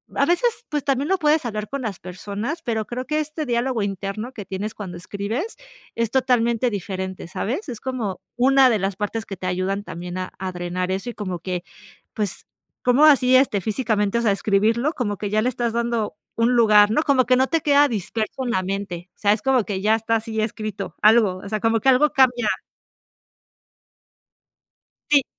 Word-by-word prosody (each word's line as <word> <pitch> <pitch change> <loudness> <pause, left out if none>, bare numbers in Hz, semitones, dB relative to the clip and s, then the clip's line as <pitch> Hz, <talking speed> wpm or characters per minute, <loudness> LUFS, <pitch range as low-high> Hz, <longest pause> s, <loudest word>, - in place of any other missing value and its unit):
a - - +3
veces, 460 +7 +1
pues, 295 -2 -2
también, 275 +1 0
lo 385 - +3
puedes 305 -2 +2
hablar 215 -2 -4
con 280 -1 -4
las 210 -5 -3
personas, 205 - -5
pero, 225 -5 -1
creo 250 +2 -4
que 305 +2 0
este 305 +1 -4
diálogo 240 -1 0
interno 200 +5 -4
que 210 -5 -7
tienes, 195 +3 -4
cuando 185 -4 -7
escribes 205 - -4 0.4
es 230 -1 -1
totalmente 245 -2 +2
diferente, 190 -3 -5
¿sabes? 265 - -3
Es 235 -3 -6
como 235 -8 -3 0.2
una 265 +2 +5
de 220 -3 +2
las 195 0 -1
partes 220 +2 -3
que 195 - -7
te 185 - -4
ayudan 185 +2 -1
también, 175 0 -6
a 185 - -4
a 190 0 -3
drenar 180 +1 -3
eso, 195 +6 -3
y - - -13
como 185 -4 -4
que, 180 0 -4 0.5
pues, 205 -3 -3 0.4
¿cómo 250 +4 +4
así, 265 -4 +6
este, 255 -6 +3
físicamente, 215 0 0
o - - -1
sea, 225 - +3
escribirlo? 220 +8 +1
Como 205 -6 -2
que 205 - -3
ya 215 +1 +2
le 245 - +1
estás 235 -1 -2
dando 235 -2 -1 0.2
un 230 +2 +2
lugar, 210 -3 +6
¿no? 305 - +2
Como 270 -5 +3
que 255 +1 +4
no 260 +1 +2
te 330 - +1
queda 290 0 +5
disperso 220 +3 -3
en 245 - -2
la 185 - +1
mente. 185 -2 -4
O - - -40
sea, 205 -1 +3
es 210 - -1
como 265 -4 +2
que 195 -2 -3
ya 215 +2 +4
está 225 +1 0
así 220 0 -3
escrito 215 -2 -4
algo, 215 -3 +5
o - - -6
sea, 215 +1 -1
como 225 +1 +2
que 270 - 0
algo 265 +4 +5
cambia. 250 -5 +3 2.6
Sí. 285 -3 +5
220 Hz, 200 wpm, -22 LUFS, 200-255 Hz, 2.6 s, así